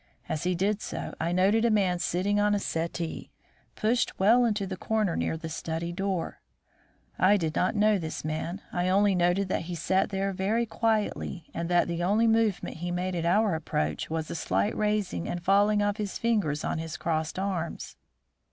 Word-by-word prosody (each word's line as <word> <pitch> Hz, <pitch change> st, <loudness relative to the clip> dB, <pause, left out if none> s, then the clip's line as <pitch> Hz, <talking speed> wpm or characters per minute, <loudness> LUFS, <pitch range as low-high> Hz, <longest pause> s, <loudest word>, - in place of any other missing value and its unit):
As 155 Hz, -, -3 dB
he 180 Hz, 0 st, +1 dB
did 200 Hz, +4 st, 0 dB
so, -, -, -5 dB
I 165 Hz, +1 st, 0 dB
noted 195 Hz, +5 st, +3 dB
a 235 Hz, -, +4 dB
man 190 Hz, -5 st, +2 dB
sitting 195 Hz, +5 st, 0 dB
on 205 Hz, 0 st, +3 dB
a -, -, +1 dB
settee 165 Hz, -2 st, -3 dB, 0.5 s
pushed 235 Hz, +3 st, 0 dB
well 230 Hz, +6 st, +5 dB
into 210 Hz, -3 st, 0 dB
the 190 Hz, 0 st, -4 dB
corner 210 Hz, -2 st, 0 dB
near 160 Hz, -, -1 dB
the 160 Hz, -, -6 dB
study 165 Hz, +1 st, -4 dB
door. 190 Hz, -1 st, -2 dB, 0.8 s
I 190 Hz, +4 st, +5 dB
did 160 Hz, -4 st, -2 dB
not 185 Hz, -, +1 dB
know 210 Hz, -1 st, +3 dB
this 160 Hz, -2 st, -5 dB
man; 160 Hz, +5 st, -3 dB
I 180 Hz, 0 st, 0 dB
only 200 Hz, +1 st, +4 dB
noted 180 Hz, +2 st, +2 dB
that 170 Hz, -, -1 dB
he 175 Hz, -, -3 dB
sat 190 Hz, +3 st, +1 dB
there 195 Hz, 0 st, -1 dB
very 205 Hz, +5 st, 0 dB
quietly, 215 Hz, -7 st, -1 dB
and 170 Hz, 0 st, -3 dB
that 175 Hz, -1 st, +3 dB
the 170 Hz, 0 st, -2 dB
only 210 Hz, +5 st, +3 dB
movement 225 Hz, -6 st, +1 dB
he 175 Hz, +2 st, -4 dB
made 180 Hz, +1 st, -2 dB
at 170 Hz, -1 st, -1 dB
our 205 Hz, +2 st, +3 dB
approach 80 Hz, -, -2 dB
was 160 Hz, -1 st, -3 dB
a -, -, -4 dB
slight 100 Hz, -, 0 dB
raising 210 Hz, -, -1 dB
and 175 Hz, -1 st, -4 dB
falling 205 Hz, +2 st, +4 dB
of 205 Hz, 0 st, 0 dB
his 205 Hz, -3 st, -3 dB
fingers 205 Hz, -11 st, 0 dB
on -, -, -1 dB
his 160 Hz, -1 st, -5 dB
crossed 160 Hz, 0 st, -2 dB
arms. 170 Hz, -, -3 dB
185 Hz, 190 wpm, -28 LUFS, 165-205 Hz, 0.8 s, well